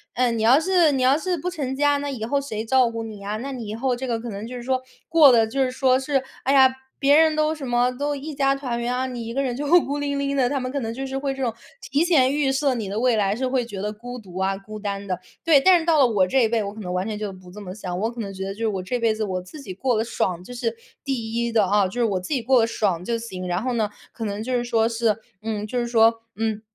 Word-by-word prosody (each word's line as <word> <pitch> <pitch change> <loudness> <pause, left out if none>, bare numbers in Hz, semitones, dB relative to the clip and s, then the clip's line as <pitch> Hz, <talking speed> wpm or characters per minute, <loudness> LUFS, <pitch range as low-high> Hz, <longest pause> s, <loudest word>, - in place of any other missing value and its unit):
嗯， 240 -2 +1
你 - - -1
要 250 +5 +6
是， 345 -3 +3
你 260 - 0
要 265 +3 +4
是 355 +1 -1
不 360 +4 -3
成 275 -7 -3
家， 290 0 +3
那 285 0 -3
以 240 -5 -5
后 280 +4 +1
谁 220 -6 -4
照 255 0 +4
顾 230 0 -5
你 215 -2 -8
呀？ 205 +2 -4
那 275 +4 -5
你 240 -5 -6
以 215 - -4
后 255 +2 0
这 260 +1 -5
个 230 -2 -1
可 235 - -6
能 205 +2 -6
就 250 - -7
是 240 - -6
说， 260 0 0 0.3
过 320 -4 +7
得 225 -2 +5
就 270 +5 -2
是 255 - 0
说 260 0 +3
是， 270 -1 0 0.2
哎 270 - +3
呀， 260 -1 +6 0.3
别 285 +1 +5
人 315 -1 +5
都 310 0 +2
什 285 -4 -7
么， 245 +1 +2
都 285 +3 -2
一 295 +2 -6
家 275 -1 +2
团 250 -4 -3
圆 240 +1 -1
啊， 255 +1 -1
你 240 -3 -5
一 - - -4
个 275 +1 0
人 245 -2 -2
就 290 +2 -3 0.2
孤 285 +1 -2
零 285 -1 -1
零 280 0 -1
的。 250 -2 +2
他 280 -1 -1
们 255 0 -4
可 280 - -2
能 225 -2 -3
就 270 +2 -5
是 265 0 -5
会 275 0 -1
这 270 0 -4
种 230 -3 0 0.3
提 290 +4 +1
前 275 -6 +4
预 285 -2 +1
设 270 0 +1
你 215 -5 -4
的 210 +2 -2
未 245 -2 +3
来， 200 0 +1
是 260 +2 -1
会 255 -1 +1
觉 200 -5 -7
得 210 +1 -3
孤 245 +3 -8
独 185 -4 -11
啊、 195 0 0
孤 215 +2 -9
单 200 -1 -4
的。 185 -1 -2 0.2
对， 300 -4 +5
但 365 0 +6
是 325 - -5
到 320 -3 +4
了 260 - +6
我 200 -5 +2
这 260 +4 +3
一 - - 0
辈， 225 -2 +1
我 200 +1 -5
可 220 - -9
能 180 -2 -5
完 185 +3 -1
全 210 -1 -4
就 210 -2 -3
不 185 -1 -14
这 210 +2 -10
么 185 -2 -7
想。 180 -3 -5
我 220 +2 0
可 240 - -10
能 195 -2 -5
觉 190 0 -5
得 195 - -3
就 210 - -15
是 225 - 0
我 195 -3 -2
这 245 +6 -2
辈 225 -1 +2
子 215 0 -3
我 185 -3 -2
自 280 +11 -11
己 190 - -7
过 250 +2 0
得 220 - +1
爽， 180 -6 -2
这 245 - -10
是 460 - -2 0.3
第 230 -5 -3
1 235 0 0
的， 220 -3 +3
哦， 205 -1 +3
就 240 +6 -3
是 - - +4
我 195 -4 0
自 180 - -9
己 255 - 0
过 250 0 +4
得 - - +3
爽 190 -6 -1
就 235 - 0
行。 185 -6 -6
然 175 +2 -1
后 255 -1 -1
呢， 215 -3 0 0.2
可 225 - -5
能 205 +1 -3
就 255 +3 -3
是 240 -1 +1
说 230 -1 +1
是， 225 -2 +1 0.3
嗯， 215 -1 -3
就 250 - -3
是 240 - -1
说， 225 -1 +4
嗯， 220 -1 -2
240 Hz, 335 characters per minute, -23 LUFS, 215-270 Hz, 0.3 s, 过